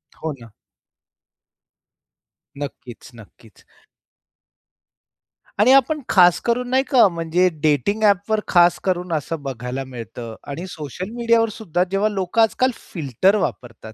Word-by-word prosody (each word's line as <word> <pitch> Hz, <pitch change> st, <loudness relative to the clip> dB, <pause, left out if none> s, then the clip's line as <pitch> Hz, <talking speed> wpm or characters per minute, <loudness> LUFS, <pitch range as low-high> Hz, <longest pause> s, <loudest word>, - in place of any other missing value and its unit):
हो 160 Hz, -, -5 dB
ना. 115 Hz, -2 st, -14 dB, 2.1 s
नक्कीच, 140 Hz, -4 st, -8 dB
नक्कीच. 110 Hz, -1 st, -18 dB, 2.0 s
आणि 235 Hz, +5 st, +5 dB
आपण 280 Hz, +3 st, +3 dB
खास 180 Hz, -2 st, +5 dB
करून, 245 Hz, +1 st, 0 dB
नाही 260 Hz, +1 st, +2 dB
का? 250 Hz, -7 st, +5 dB
म्हणजे 170 Hz, +1 st, 0 dB
डेटिंग 155 Hz, -, +1 dB
ॲपवर 205 Hz, +1 st, +2 dB
खास 175 Hz, -2 st, +4 dB
करून 180 Hz, -2 st, -2 dB
असं 155 Hz, +1 st, -3 dB
बघायला 130 Hz, 0 st, -5 dB
मिळतं 120 Hz, -2 st, -9 dB
आणि 145 Hz, +6 st, -6 dB
सोशल 170 Hz, -, -7 dB
मीडियावर 230 Hz, -1 st, +2 dB
सुद्धा 180 Hz, -5 st, -2 dB
जेव्हा 200 Hz, +2 st, +1 dB
लोकं 195 Hz, +2 st, 0 dB
आजकाल 255 Hz, +3 st, +2 dB
फिल्टर 165 Hz, -, 0 dB
वापरतात. 115 Hz, -, -5 dB
180 Hz, 115 wpm, -21 LUFS, 140-215 Hz, 2.1 s, आणि